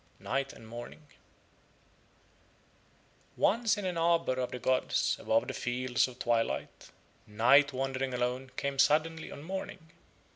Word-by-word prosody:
NIGHT 135 0 -2
AND 110 - -14
MORNING 120 +6 -9 2.3
Once 225 +1 +2
in 205 - -4
an 180 -2 -2
arbour 170 -4 +2
of 130 -1 -2
the - - -5
gods 130 +1 +1
above 115 +3 +1
the 130 - -3
fields 125 +1 0
of 125 -1 -11
twilight 115 -2 -1 0.4
Night 130 +7 +5
wandering 135 0 -2
alone 125 +1 -2
came 140 -1 -2
suddenly 160 +3 +2
on 145 - -9
Morning. 165 -2 -6
135 Hz, 130 wpm, -31 LUFS, 125-160 Hz, 2.3 s, Night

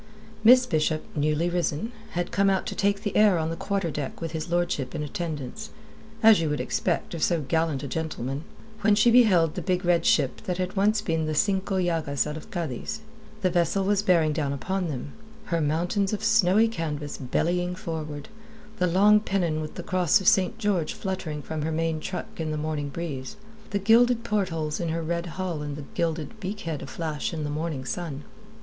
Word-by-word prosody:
Miss 250 +3 +8
Bishop, 155 -5 0
newly 155 +2 +1
risen, 175 +4 -1 0.2
had 175 0 -2
come 200 0 +3
out 190 -1 +1
to - - -3
take 200 0 0
the 205 - -3
air 210 -4 +5
on 160 0 -1
the - - -3
quarter 195 -2 -2
deck 145 -2 -4
with 165 -1 -4
his 160 +1 -4
lordship 170 -5 -1
in 150 - -2
attendance 155 - -5 0.5
as 220 -5 +7
you 160 - 0
would 150 - -1
expect 175 -1 -1
of 165 - -4
so 170 -1 +2
gallant 160 -1 0
a - - -3
gentleman 145 -2 -3 0.4
when 210 -1 +4
she 225 +3 +5
beheld 190 -10 +5
the - - -4
big 180 -1 -1
red 170 -1 +3
ship 135 -7 +2
that 180 -1 -2
had 185 +1 -3
once 205 +2 +3
been 160 -5 -1
the 155 - -1
Cinco 195 +2 +1
Llagas 165 -6 0
out 150 0 -4
of 155 - -9
Cadiz. 170 - -4 0.4
The 185 -2 +2
vessel 175 +2 +1
was 200 +1 +2
bearing 170 -6 +3
down 145 -3 -1
upon 185 +6 -2
them, 140 -2 -5 0.4
her 165 - +2
mountains 175 +7 0
of 210 - -3
snowy 220 -1 +4
canvas 150 -8 -4
bellying 175 +7 0
forward, 155 -4 -5 0.5
the 180 - +2
long 205 +4 +5
pennon 180 -7 -1
with 155 - -6
the 175 - -6
cross 185 +2 +3
of 190 - -4
St. 190 +3 +4
George 200 -8 0
fluttering 175 -6 -4
from 155 +1 -4
her 160 +2 -1
main 165 0 0
truck 180 +3 -6
in 160 -1 -2
the 155 - -2
morning 150 -1 -2
breeze, 140 0 -5 0.3
the 200 - 0
gilded 230 +4 +4
portholes 180 -9 -1
in 170 - -1
her 165 +1 -2
red 170 +2 -2
hull 180 -5 -2
and 145 -1 -4
the 145 -1 -7
gilded 170 +5 -2
beak 205 +1 -5
head 160 -3 -4
aflash 160 -1 -4
in 155 - -3
the 145 - -2
morning 150 -3 -3
sun. 150 -3 -4
170 Hz, 200 wpm, -26 LUFS, 155-195 Hz, 0.5 s, Miss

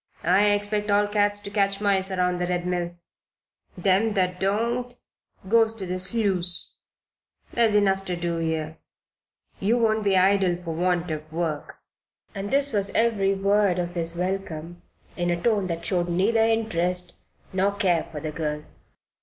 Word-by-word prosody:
I 185 +4 +4
expect 205 0 +1
all 205 0 +3
cats 205 0 +1
to 200 - -8
catch 200 -1 +1
mice 195 -2 +1
around 180 -1 0
the 180 - -1
Red 180 0 -1
Mill. 175 -1 -2 0.8
Them 195 +4 +2
that 180 -1 0
don't 235 +5 -1 0.5
goes 225 +1 +4
into 210 -4 -7
the 180 0 -3
sluice. 185 -3 0 0.8
There's 230 -3 +3
enough 195 -2 +3
to 180 - -2
do 170 -1 -2
here. 160 -1 -2 0.8
You 220 +5 +2
won't 220 -2 +2
be 195 -2 +3
idle 190 -1 +3
for 165 -2 -4
want 175 0 0
of 155 0 -6
work." 160 -2 -3 0.6
And 200 0 -4
this 280 0 +1
was 200 -1 0
every 205 -4 +2
word 200 -1 +2
of 175 -1 -2
his 170 -1 -4
welcome, 175 -2 -4 0.3
in 175 -1 -1
a 175 0 0
tone 205 -1 +1
that 170 -1 -4
showed 175 -2 0
neither 200 +6 +2
interest 180 -6 0 0.4
nor 195 +2 +1
care 180 -6 +1
for 150 - -5
the 155 0 -4
girl. 150 -1 -3
190 Hz, 160 wpm, -25 LUFS, 175-205 Hz, 0.8 s, I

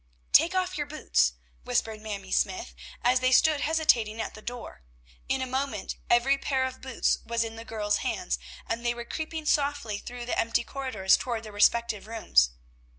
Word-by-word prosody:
"Take 335 +4 +6
off 370 -2 0
your 295 - -2
boots," 65 - +1 0.3
whispered 215 - -1
Mamie 200 -3 -6
Smythe, 360 -1 0 0.3
as 250 +1 +4
they 255 0 +2
stood 305 +2 +5
hesitating 245 -9 +2
at - - -3
the 215 - -11
door. 240 - -7 0.5
In 265 0 +1
a - - -1
moment 260 -4 -3
every 265 +4 +4
pair 265 -2 0
of 260 0 -6
boots 260 -2 0
was 230 0 0
in 225 0 -6
the 225 - -8
girls' 210 -2 -1
hands, - - -2 0.3
and 230 +1 -3
they 240 0 0
were 235 0 -6
creeping 315 +3 -5
softly 285 -8 0
through 245 +1 -7
the 245 - -1
empty 230 +1 +1
corridors 235 -9 +1
toward 235 -3 -3
their 215 - -9
respective 210 0 +2
rooms. 210 - +3
240 Hz, 180 wpm, -28 LUFS, 220-275 Hz, 0.5 s, Take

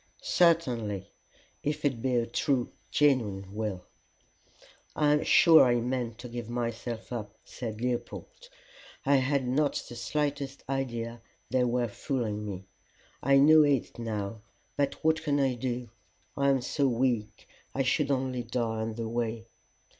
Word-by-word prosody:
"Certainly, 120 - +2 0.5
if 150 +1 -2
it 130 -5 0
be 130 0 0
a 120 -1 +2
true, 125 +1 0 0.2
genuine 105 -10 +1
will." 105 -4 -3 1.1
"I 150 -1 +3
am 150 - +2
sure 165 -2 +7
I 120 -1 +3
meant 120 -1 -2
to 125 - -8
give 120 -1 -6
myself 120 0 -4
up," 105 -3 -6
said 110 -3 -6
Leopold. 125 - -4 0.6
"I 140 +1 +5
had 135 0 +1
not 145 +3 +2
the 120 - -9
slightest 140 +1 -2
idea 120 -4 -3 0.3
they 125 -1 +3
were 120 0 +1
fooling 110 -2 -3
me. 95 -2 -6 0.6
I 140 +1 +4
know 155 +3 +7
it 140 -5 +1
now, 110 -2 -4 0.3
but 140 -1 0
what 160 0 +3
can 145 -3 +1
I 135 -2 +2
do? 120 -1 -4 0.4
I 140 0 +2
am 135 -2 +3
so 140 +3 0
weak, 120 -3 -1 0.3
I 135 - +1
should 135 +3 +1
only 130 -2 0
die 115 -2 -2
on 110 0 -3
the 115 -1 -3
way." 115 -1 -2
125 Hz, 145 wpm, -29 LUFS, 115-140 Hz, 1.1 s, sure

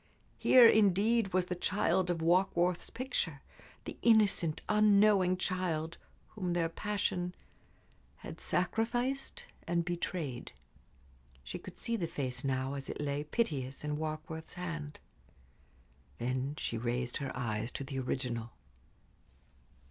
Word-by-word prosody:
Here, 250 -2 +8
indeed, 215 0 +4
was 185 0 +2
the 180 - -3
child 180 0 +1
of 165 -2 -1
Warkworth's 175 0 +2
picture 205 - -3 0.4
the - - -7
innocent, 205 -8 +3
unknowing 205 -3 +5
child, 175 -4 -2 0.3
whom 185 -5 -3
their 170 -1 +1
passion 180 -1 -2 0.9
had - - -7
sacrificed 245 - -1 0.2
and 170 0 +1
betrayed. 170 -7 -3 0.9
She - - -6
could - - -11
see 230 0 -1
the 170 -5 -2
face 135 -6 -4
now, 135 0 -1
as 140 -1 -6
it - - -5
lay 145 0 -1
piteous, 145 - -2
in 150 0 -1
Warkworth's 155 +1 -5
hand. 165 -5 -5 1.2
Then 130 +4 -2
she 115 - -2
raised 120 +1 -2
her 140 -2 -4
eyes 110 -2 -2
to - - -4
the 135 0 -4
original. 120 -3 -3
170 Hz, 120 wpm, -33 LUFS, 140-195 Hz, 1.2 s, Here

